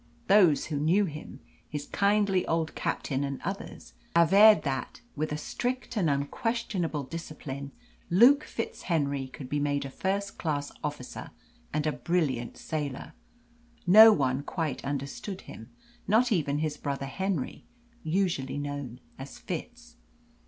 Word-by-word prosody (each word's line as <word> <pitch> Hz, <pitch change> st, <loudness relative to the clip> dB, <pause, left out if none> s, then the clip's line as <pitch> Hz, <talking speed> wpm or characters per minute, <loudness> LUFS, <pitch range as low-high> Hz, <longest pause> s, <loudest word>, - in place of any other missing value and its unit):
Those 185 Hz, -7 st, +5 dB
who 150 Hz, -, -3 dB
knew 175 Hz, +8 st, +3 dB
him 155 Hz, -3 st, -8 dB, 0.3 s
his 145 Hz, -1 st, -4 dB
kindly 200 Hz, -1 st, +2 dB
old 160 Hz, -1 st, 0 dB
captain 135 Hz, -1 st, -2 dB
and 140 Hz, -1 st, -3 dB
others -, -, -6 dB, 0.2 s
averred 200 Hz, +6 st, +7 dB
that, 135 Hz, -2 st, -3 dB
with 155 Hz, +1 st, -2 dB
a 150 Hz, -, -1 dB
strict 250 Hz, +11 st, -3 dB
and 185 Hz, -7 st, +2 dB
unquestionable 165 Hz, +2 st, -1 dB
discipline, 140 Hz, -2 st, -7 dB, 0.4 s
Luke 250 Hz, -, +6 dB
FitzHenry 140 Hz, -, -2 dB
could 130 Hz, -, -8 dB
be 145 Hz, +3 st, -1 dB
made 145 Hz, -1 st, 0 dB
a 135 Hz, -, -6 dB
first 200 Hz, +5 st, -2 dB
class 145 Hz, -3 st, -2 dB
officer 145 Hz, -4 st, -5 dB, 0.4 s
and 150 Hz, 0 st, -1 dB
a 155 Hz, -, +2 dB
brilliant 145 Hz, -9 st, -1 dB
sailor. 145 Hz, -4 st, -4 dB, 0.7 s
No 215 Hz, +5 st, +10 dB
one 135 Hz, -7 st, +1 dB
quite 145 Hz, -3 st, -3 dB
understood 140 Hz, +8 st, -4 dB
him, 110 Hz, +2 st, -11 dB, 0.4 s
not 230 Hz, +5 st, +3 dB
even 145 Hz, -7 st, +1 dB
his 150 Hz, -1 st, -2 dB
brother 140 Hz, -1 st, -3 dB
Henry, 185 Hz, 0 st, -3 dB, 0.4 s
usually 160 Hz, -6 st, 0 dB
known 145 Hz, -4 st, -5 dB, 0.2 s
as 135 Hz, +1 st, -8 dB
Fitz. 240 Hz, +7 st, -7 dB
155 Hz, 130 wpm, -28 LUFS, 140-195 Hz, 0.7 s, No